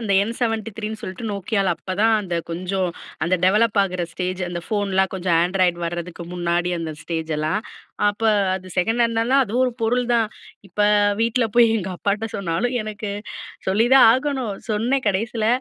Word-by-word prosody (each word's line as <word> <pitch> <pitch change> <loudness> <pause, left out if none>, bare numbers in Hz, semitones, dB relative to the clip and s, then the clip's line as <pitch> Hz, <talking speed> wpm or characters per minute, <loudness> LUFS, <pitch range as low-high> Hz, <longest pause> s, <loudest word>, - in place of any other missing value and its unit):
அந்த 215 -4 -1
என் 225 - -2
73ன்னு 220 -1 -2
சொல்ட்டு 190 +5 -6
Nokiaல 200 -1 0
அப்பதான் 205 +4 +1
அந்த 180 -4 -4 0.2
கொஞ்சம், 185 +1 -1 0.3
அந்த 175 +3 +2
டெவலப் 210 +3 +3
ஆகுற 180 -2 -2
ஸ்டேஜ். 185 0 -3
அந்த 175 -1 -4
ஃபோன்லாம் 195 -3 0
கொஞ்சம் 180 -2 +1
ஆண்ட்ராய்டு 180 -1 +1
வரதுக்கு 175 0 -5
முன்னாடி 175 0 0
அந்த 160 -1 -4
ஸ்டேஜ் 160 -1 -3
லாம். 200 +8 -1 0.4
அப்போ 220 +2 0 0.3
அது 185 0 -6
செகண்ட் 225 +6 +1
ஹேண்ட் 230 -1 +1
லாம் 275 0 +6
அதுவும் 245 +4 +1
ஒரு 250 - -2
பொருள் 245 +2 +1
தான். 225 -2 +2 0.4
இப்ப 195 +4 -5 0.4
வீட்ல 230 +1 +2
போய் 235 -1 +8
எங்க 190 -3 -3
அப்பாட்ட 205 +4 -1
சொன்னாலும். 200 +7 -1
எனக்கு 215 -1 -5 0.6
சொல்லிதான் 240 +7 +6
ஆகணும். 260 -5 -1 0.2
சொன்னேன் 240 +5 0
கடைசியில. 220 +3 -1
200 Hz, 160 wpm, -22 LUFS, 180-225 Hz, 0.6 s, போய்